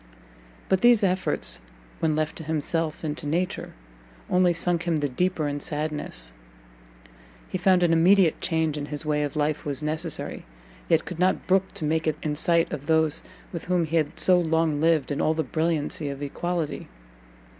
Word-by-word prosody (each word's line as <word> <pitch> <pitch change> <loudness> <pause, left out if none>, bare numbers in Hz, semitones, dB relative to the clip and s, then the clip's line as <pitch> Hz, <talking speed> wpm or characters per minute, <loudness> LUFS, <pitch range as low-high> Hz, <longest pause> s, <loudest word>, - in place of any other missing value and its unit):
But 190 -1 +2
these 240 -3 +5
efforts, 185 -1 +1 0.4
when 155 -2 +1
left 155 0 -1
to - - -7
himself 160 +1 -2
and 150 -2 -2
to 150 - -6
nature, 175 +5 -2 0.6
only 180 -1 +4
sunk 175 0 +1
him 170 - +2
the 145 -1 0
deeper 160 +3 -1
in 145 0 -3
sadness; 150 - -2 1.1
he 185 - -4
found 180 0 +4
an 170 -1 +3
immediate 175 +1 +4
change 160 -3 0
in 145 - -5
his 150 +1 -6
way 150 -1 +1
of 145 -1 -3
life 150 0 0
was 145 -1 -3
necessary, 155 +1 -3 0.5
yet 165 - +3
could 175 -2 -7
not 185 +1 +1
brook 190 0 +2
to 155 - -3
make 160 +1 0
it 155 -1 0
in 150 - -1
sight 165 +2 +2
of 145 -1 -6
those 160 -2 +2 0.3
with 170 - -5
whom 180 -1 +1
he 165 +2 0
had 155 -2 -1
so 180 -1 +5
long 160 -3 +1
lived 160 -3 +2
in 145 - -1
all 155 - +2
the 160 - 0
brilliancy 155 0 -1
of 140 +1 -6
equality. 170 +2 -3
160 Hz, 180 wpm, -25 LUFS, 150-175 Hz, 1.1 s, these